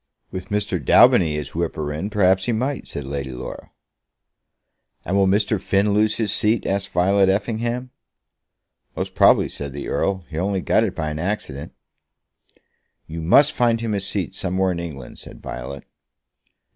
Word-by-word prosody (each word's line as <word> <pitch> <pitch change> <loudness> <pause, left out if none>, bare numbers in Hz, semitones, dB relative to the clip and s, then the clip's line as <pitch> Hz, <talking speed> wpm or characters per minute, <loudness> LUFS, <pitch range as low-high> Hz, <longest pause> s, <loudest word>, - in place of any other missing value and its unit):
"With 95 0 -6
Mr. 105 -5 -1
Daubeny 75 +3 +5
as 75 - -5
whipper 75 -1 -2
in, 90 +7 -3
perhaps 95 -3 +2
he - - 0
might," 130 +5 -2
said 70 - -6
Lady 70 -1 -4
Laura. 65 0 -8 1.4
"And 90 - -1
will 100 -1 +4
Mr. 100 +2 +1
Finn 100 +1 +1
lose 105 +1 +2
his 110 -4 0
seat?" 110 +1 +1
asked 100 0 -1
Violet 95 +2 +3
Effingham. 120 +5 -1 1.0
"Most - - -4
probably," - - +5
said 70 -2 -7
the 70 - -6
Earl. 95 -3 -1
"He 80 -1 -5
only 95 +1 -1
got 110 - +2
it 100 -4 -2
by 75 -2 -2
an 75 - -5
accident." 90 -6 -4 1.3
"You 80 +1 -6
must 135 - +5
find 120 -2 +1
him 115 -2 -2
a 100 - 0
seat 95 -1 -3
somewhere 95 0 0
in 85 - -3
England," 75 -7 -8
said - - -12
Violet. 65 +3 -7
95 Hz, 160 wpm, -22 LUFS, 80-105 Hz, 1.4 s, Daubeny